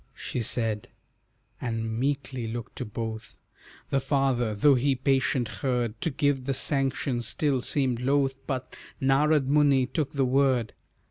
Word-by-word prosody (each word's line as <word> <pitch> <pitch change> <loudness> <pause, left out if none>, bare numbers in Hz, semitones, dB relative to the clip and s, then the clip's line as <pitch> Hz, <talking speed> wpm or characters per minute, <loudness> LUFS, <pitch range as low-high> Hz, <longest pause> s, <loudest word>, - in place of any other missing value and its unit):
She 125 - -4
said, 110 -2 -1 0.7
and 115 -1 -2
meekly 135 -3 -2
looked 115 0 -6
to - - -3
both. 110 +1 -6 0.5
The 135 - +3
father, 135 -5 +1
though 140 +8 +5
he 135 +2 +2
patient 130 -1 +1
heard, 120 -4 -1
To - - 0
give 140 -2 0
the 135 0 -1
sanction 135 -3 0
still 135 +1 0
seemed 130 -3 0
loth, 135 0 +1
But 130 -2 -4 0.2
Narad 140 +2 +3
Muni 140 -2 +4
took 140 +2 -2
the 140 -2 +2
word. 130 -3 +2
130 Hz, 140 wpm, -27 LUFS, 120-140 Hz, 0.7 s, though